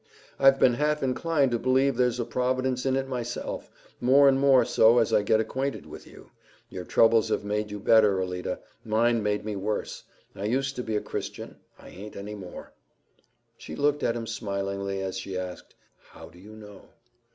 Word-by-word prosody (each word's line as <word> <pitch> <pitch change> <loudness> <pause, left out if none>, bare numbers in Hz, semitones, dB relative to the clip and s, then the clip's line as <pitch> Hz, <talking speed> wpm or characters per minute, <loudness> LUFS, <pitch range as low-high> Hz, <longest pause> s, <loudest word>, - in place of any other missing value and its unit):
"I've 135 0 +6
been 125 - +5
half 150 +3 0
inclined 140 +1 +1
to 120 - 0
believe 130 +2 +2
there's 125 0 +1
a 120 - -1
Providence 130 +1 -1
in 130 - +2
it 135 0 -1
myself 120 -2 -5 0.3
more 135 +3 +5
and 135 -1 +4
more 135 -3 +5
so 115 -1 +4
as 115 -2 +2
I - - +4
get 110 +1 +2
acquainted 135 +5 -3
with - - -11
you. - - -16 0.4
Your 90 -1 -7
troubles 115 +2 +3
have - - -1
made 105 +1 -2
you 105 0 -6
better, 105 -2 +4
Alida; 90 -1 -3 0.2
mine 115 +1 +1
made 105 0 -1
me 105 -1 -3
worse. 105 +2 -3 0.3
I 100 - -5
used 135 +4 -1
to - - -1
be 110 -2 -3
a 105 - 0
Christian; - - -6 0.2
I - - -14
aint 105 +3 -10
any 100 +2 -7
more." 95 -4 -10 0.9
She 80 - -8
looked 145 - +1
at 115 - 0
him 115 -1 -4
smilingly 100 -2 -3
as 95 0 -4
she 95 0 -5
asked, 90 -1 -7 0.2
"How 80 0 -14
do 85 +1 -18
you 105 +3 -13
know?" 105 -2 -13
115 Hz, 190 wpm, -26 LUFS, 100-130 Hz, 0.9 s, I've